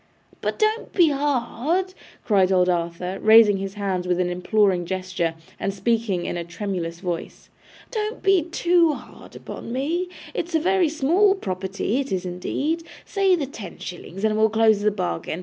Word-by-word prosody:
'But - - -2
don't 435 +1 0
be 345 -4 +5
hard,' 290 +6 0 0.3
cried 195 -3 +3
old 180 -1 +4
Arthur, 175 +2 -2
raising 220 -2 +7
his 195 +1 -5
hands 190 -3 -2
with 180 0 +1
an 180 -1 +1
imploring 185 0 +2
gesture, 185 -3 -2 0.2
and 195 - -1
speaking, 200 -2 0
in - - -3
a 170 - -3
tremulous 170 -2 -4
voice. 175 -3 -5 0.4
'Don't 435 -1 -3
be 390 -2 +4
too 340 0 +2
hard - - -12
upon - - -8
me. 325 +8 -1 0.2
It's 340 0 -3
a - - +4
very 365 0 +2
small 345 +7 +3
property, 195 - -2
it 275 - -3
is 190 -1 -1
indeed. 275 - -2 0.2
Say 390 -2 +2
the 310 -5 -2
ten 230 -7 -9
shillings, 180 +2 -8
and 215 -1 +2
we'll 220 0 +4
close 220 -1 +3
the 210 - +3
bargain. 180 -4 -3
215 Hz, 165 wpm, -23 LUFS, -, 0.4 s, raising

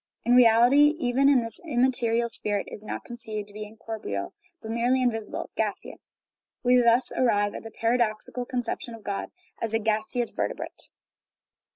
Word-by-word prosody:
In 240 - +4
real 230 -2 +7
ity, 290 +4 +6
even 265 -2 +2 0.2
this 230 -2 -7
immaterial 240 -5 +1
spirit 205 -3 -2
is - - -8
not 215 - -6
conceived 220 -4 -6
to - - -16
be 210 0 -6
incorporeal, 215 - -5 0.3
but 220 - -7
merely 240 +3 +2
invisible, 225 -4 -2
gaseous. - - -4 0.5
We 250 0 +5
thus 240 +1 +3
arrive 205 -5 +2
at - - -6
the 225 - -9
paradoxical 230 +1 -1
conception 245 -2 -3
of 220 - -14
God 200 -1 -3 0.3
as 225 -1 -2
a - - +2
gaseous 220 +2 -1
vertebrate. - - -4
230 Hz, 155 wpm, -26 LUFS, 215-245 Hz, 0.5 s, real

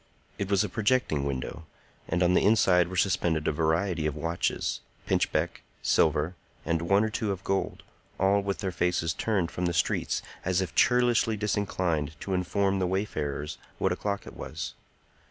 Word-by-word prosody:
It 100 -1 -2
was 100 -1 +3
a - - -1
projecting 105 - +1
window; 70 +4 -4 0.4
and 90 +2 +1
on 90 +1 +4
the - - +4
inside 95 -4 +4
were 95 +1 -5
suspended 85 -5 +1
a - - +3
variety 80 +2 +1
of 75 - -2
watches, 85 +3 -1 0.3
pinchbeck, - - 0 0.2
silver, 80 +2 +2 0.3
and 80 +1 0
one 100 +5 +3
or 110 - -1
two 105 -1 -1
of 95 -1 -5
gold, 95 0 -1 0.4
all 100 +2 +3
with 100 0 -3
their 95 -2 -1
faces 85 -2 0
turned 95 -5 0
from 90 0 -1
the 85 - -1
streets, 75 - 0 0.2
as 90 0 +1
if 95 -4 -2
churlishly 120 -3 +3
disinclined 90 -8 -1
to 95 - -3
inform 95 +2 +1
the 90 - +1
wayfarers 75 -6 -2 0.2
what - - +1
o'clock 100 -1 -2
it - - -10
was. - - -5
90 Hz, 170 wpm, -28 LUFS, 80-100 Hz, 0.4 s, on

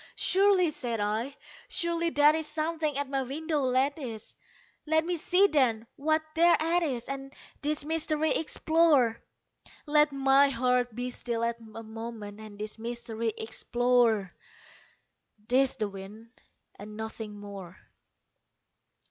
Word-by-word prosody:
"Surely," 380 -3 +3
said 240 -6 -3
I, 220 +7 -2 0.3
"surely 340 0 0
that 295 -1 +5
is 315 -1 -2
something 310 -1 -2
at 285 0 -1
my 270 0 -1
window 300 +3 -2
lattice; 260 -3 -1 0.5
Let 315 +1 +2
me 355 +1 -1
see 360 +4 +3
then, 255 - +2
what 310 +2 +1
thereat 335 0 +3
is, 255 -8 -2
and 270 0 -6 0.3
this 295 0 -2
mystery 315 -1 0
explore 315 -7 +2 0.6
Let 300 0 +4
my 275 0 +4
heart 250 -2 +1
be 250 +1 -3
still 235 -2 -3
a 235 0 +1 0.3
moment 220 -2 -8
and 215 -2 -10
this 215 +1 -6
mystery 230 -1 -3
explore; 230 -3 +1 1.1
'Tis 265 +1 +3
the 215 - -1
wind 200 +4 -10 0.5
and 210 +1 -9
nothing 220 -1 -6
more!" 195 -3 -9
265 Hz, 120 wpm, -29 LUFS, 225-310 Hz, 1.1 s, that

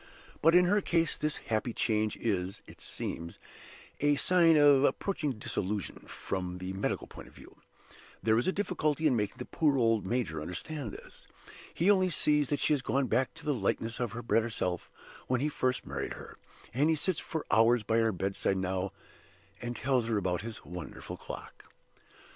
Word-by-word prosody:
But 165 +2 +5
in 180 0 +7
her 205 +3 +3
case 165 -3 +1
this 150 -1 -1 0.2
happy 110 +2 0
change 110 -1 0
is, 95 -4 -2
it - - -14
seems, 85 0 -5 0.6
a 145 0 +3
sign 165 +1 +5
of 145 -2 +6
approaching 155 -3 0
dissolution, 105 -2 -3
from 90 -2 -4
the 90 +1 -5
medical 95 - -2
point - - -11
of - - -18
view. - - -15 0.7
There 110 +1 +4
is 120 - -1
a - - +4
difficulty 160 -6 -1
in 140 -5 +4
making 105 +2 -1
the 125 - -6
poor 150 -4 +2
old, 115 -3 +3
major 95 -8 -1
understand 110 - -5
this. - - -12 0.4
He 180 +5 +3
only 185 -2 +3
sees 150 -4 +3
that 145 - 0
she - - +2
has 145 - +1
gone 135 +1 +1
back 125 +4 0
to 165 -1 -12
the 150 - +2
likeness 115 0 -1
of 120 -4 -2
her 120 +1 -5
better 115 -1 +2
self 90 -6 -2 0.4
when 125 -1 +1
he 150 +4 +1
first 130 -3 -1
married - - -4
her; - - -10 0.4
and 145 +6 +3
he 160 - +4
sits 160 +2 0
for 160 -2 -4
hours 115 +1 +5
by 110 +2 +2
her 115 -1 +3
bedside 95 +1 -1
now, 95 +1 -1 0.7
and 120 0 -4
tells 125 -2 +1
her 115 -2 +1
about 90 -3 0
his 110 +1 -8
wonderful 90 0 -7
clock. - - -9
120 Hz, 185 wpm, -31 LUFS, 105-150 Hz, 0.7 s, in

